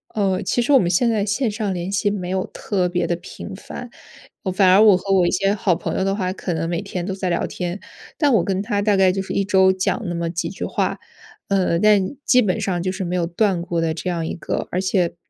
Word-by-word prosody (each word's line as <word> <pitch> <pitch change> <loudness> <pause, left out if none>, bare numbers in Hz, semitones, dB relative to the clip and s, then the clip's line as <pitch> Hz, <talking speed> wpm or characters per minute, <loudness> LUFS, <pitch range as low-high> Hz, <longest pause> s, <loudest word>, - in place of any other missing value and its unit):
呃， 195 -2 +1
其 240 +5 0
实 245 - 0
我 270 - +7
们 175 - +1
现 190 +7 +2
在 215 -3 +1
线 215 +3 0
上 210 -2 -2
联 180 +2 -4
系 200 +1 +1
没 185 -3 -4
有 190 0 -1
特 185 -4 -2
别 180 0 0
地 175 - 0
频 190 +2 -9
繁， 240 +4 -9 0.7
反 195 -2 +4
而 195 +3 +6
我 205 -4 +7
和 195 +1 -2
我 180 -2 +4
一 - - +2
些 195 +1 +1
好 195 -4 +1
朋 - - -4
友 190 - 0
的 195 0 0
话 185 -2 -2
可 180 -3 -4
能 165 +1 -2
每 170 0 -2
天 185 -3 -5
都 190 - -3
在 190 -2 -3
聊 170 - 0
天， 180 +2 -4 0.4
但 290 -5 +3
我 190 -6 +4
跟 190 -1 -1
他 205 -2 -1
大 205 -1 +2
概 190 -1 +4
就 190 +1 -2
是 190 - -5
一 200 - +1
周 190 -1 +4
讲 190 +5 -1
那 175 - -3
么 170 0 -2
几 175 +1 -3
句 - - -5
话。 - - -1 0.5
呃， 185 -4 +1
但 210 +3 +3
基 250 -1 +5
本 185 -3 0
上 180 -3 -1
就 185 - -1
是 190 0 -4
没 180 +1 -2
有 170 -2 +1
断 185 +1 +1
过 170 -2 -2
的 165 -1 0
这 170 - -6
样 170 -2 -1
一 - - -4
个 - - -3
而 180 - 0
且 185 -3 0
190 Hz, 280 characters per minute, -21 LUFS, 180-205 Hz, 0.7 s, 我